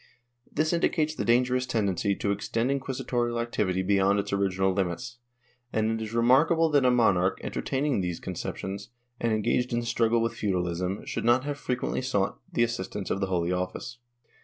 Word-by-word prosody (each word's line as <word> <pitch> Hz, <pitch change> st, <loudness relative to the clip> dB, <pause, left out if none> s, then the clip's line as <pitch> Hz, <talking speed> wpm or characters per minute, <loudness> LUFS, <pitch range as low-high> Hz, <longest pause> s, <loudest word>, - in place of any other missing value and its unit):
^ -, -, -27 dB, 0.5 s
This 155 Hz, +3 st, +1 dB
indicates 155 Hz, -2 st, +1 dB
the -, -, -3 dB
dangerous 125 Hz, +1 st, +2 dB
tendency 100 Hz, -3 st, 0 dB
to 100 Hz, -, -1 dB
extend 115 Hz, +5 st, -1 dB
inquisitorial 125 Hz, -3 st, -1 dB
activity 95 Hz, -6 st, 0 dB
beyond 100 Hz, +1 st, +3 dB
its 100 Hz, -, -2 dB
original 95 Hz, -1 st, +1 dB
limits, 100 Hz, +6 st, -3 dB, 0.5 s
and 110 Hz, 0 st, +1 dB
it 110 Hz, 0 st, -2 dB
is 110 Hz, -, -6 dB
remarkable 155 Hz, +8 st, +4 dB
that 145 Hz, -2 st, +4 dB
a 125 Hz, -, +5 dB
monarch 95 Hz, -7 st, +3 dB
entertaining 135 Hz, -5 st, -1 dB
these 90 Hz, -2 st, -3 dB
conceptions 100 Hz, +1 st, -5 dB, 0.3 s
and 115 Hz, -, 0 dB
engaged 120 Hz, +3 st, +1 dB
in 120 Hz, -, +2 dB
the -, -, -6 dB
struggle 115 Hz, 0 st, +2 dB
with 115 Hz, 0 st, 0 dB
feudalism 90 Hz, -1 st, -2 dB
should -, -, -3 dB
not 120 Hz, +2 st, +4 dB
have 145 Hz, -1 st, -4 dB
frequently 125 Hz, 0 st, -2 dB
sought 105 Hz, -7 st, -1 dB
the 120 Hz, -, +2 dB
assistance 105 Hz, -3 st, -3 dB
of 95 Hz, -, 0 dB
the 95 Hz, -, +1 dB
Holy 90 Hz, -2 st, 0 dB
Office. 95 Hz, +7 st, -4 dB
115 Hz, 175 wpm, -27 LUFS, 95-125 Hz, 0.5 s, a